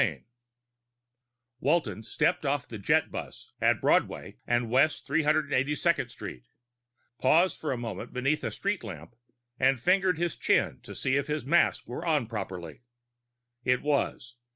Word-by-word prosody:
XVII - - 0 1.4
Walton 150 -6 +1
stepped 115 - 0
off 140 -1 -1
the 110 - -7
jetbus 100 - -1
at - - +3
Broadway - - +1
and 120 -1 +1
West 135 +5 +3
382nd 150 -2 +1
Street, - - -9 0.7
paused 165 +8 +3
for 155 - -2
a 130 - -1
moment 115 0 -6
beneath 135 +4 0
a - - -1
street 200 -5 -2
lamp, 100 0 -9 0.4
and 135 -1 +3
fingered 180 +3 +3
his 175 0 -1
chin - - +1
to - - -10
see 135 +1 +1
if 140 - -1
his 150 -3 -2
mask 170 +5 +2
were 125 +7 -5
on 155 -7 +1
properly. 95 -6 -6 0.8
It 125 0 +1
was. 140 -4 -1
135 Hz, 140 wpm, -28 LUFS, 120-155 Hz, 1.4 s, at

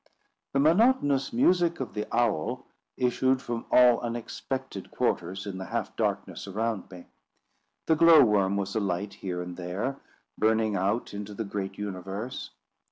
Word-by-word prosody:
The 135 - +2
monotonous 155 - +3
music 180 - +3
of 130 - -5
the 105 - -3
owl 110 -10 0 0.3
issued 130 +1 +2
from 120 -3 -5
all 125 -1 +6
unexpected 120 -1 -5
quarters 95 +3 -1
in 95 -2 -5
the 95 - -5
half - - -3
darkness - - -2
around 110 +1 -2
me. 90 -2 -11 0.8
The 160 - +3
glow 165 -2 +8
worm 100 -3 +2
was 100 +1 -3
alight 100 -1 -1
here 90 -2 -4
and 90 0 -8
there, 95 +10 -3 0.4
burning 110 -1 +2
out 100 +5 -1
into 105 0 -6
the 110 - -3
great 100 -1 -4
universe. 100 +4 -5
110 Hz, 145 wpm, -27 LUFS, 95-130 Hz, 0.8 s, glow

